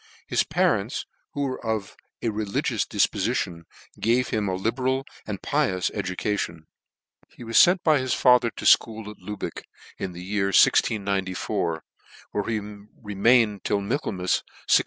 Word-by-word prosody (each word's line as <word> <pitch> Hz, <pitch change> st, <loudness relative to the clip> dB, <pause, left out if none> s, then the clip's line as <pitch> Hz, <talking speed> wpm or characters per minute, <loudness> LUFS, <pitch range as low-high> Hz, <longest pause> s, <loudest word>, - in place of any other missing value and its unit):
His -, -, +1 dB
parents, -, -, 0 dB, 0.3 s
who 145 Hz, -, -2 dB
were 130 Hz, -2 st, -3 dB
of 110 Hz, -3 st, -3 dB, 0.3 s
a 115 Hz, -, +1 dB
religious 105 Hz, -2 st, -1 dB
difpofition, 85 Hz, -1 st, 0 dB, 0.3 s
gave 120 Hz, +3 st, +2 dB
him 105 Hz, -2 st, -1 dB
a 95 Hz, -, -1 dB
libeial 130 Hz, +6 st, -1 dB, 0.2 s
and 100 Hz, -3 st, -4 dB
pi 150 Hz, -1 st, +1 dB
ous 95 Hz, -1 st, -1 dB
education. 95 Hz, -4 st, -3 dB, 0.7 s
He -, -, -9 dB
was 115 Hz, 0 st, -6 dB
ftrnt 180 Hz, +1 st, +6 dB
by 155 Hz, -3 st, +4 dB
his 130 Hz, -1 st, 0 dB
father 125 Hz, -2 st, +5 dB
to' -, -, -9 dB
fcho'ol 110 Hz, -2 st, +3 dB
at 105 Hz, -, -14 dB
Lubeck 105 Hz, -1 st, -6 dB, 0.4 s
in 95 Hz, -2 st, -4 dB
the 90 Hz, +1 st, -8 dB
year 100 Hz, +1 st, 0 dB
1694, 95 Hz, -4 st, +1 dB, 0.5 s
where 105 Hz, -, -1 dB
he 115 Hz, -2 st, -1 dB, 0.4 s
remained 105 Hz, 0 st, +2 dB
till 105 Hz, -, +1 dB
Michael 105 Hz, +6 st, -2 dB
mas 90 Hz, -1 st, 0 dB, 0.3 s
1698. -, -, +8 dB
105 Hz, 150 wpm, -25 LUFS, 95-120 Hz, 0.7 s, 1698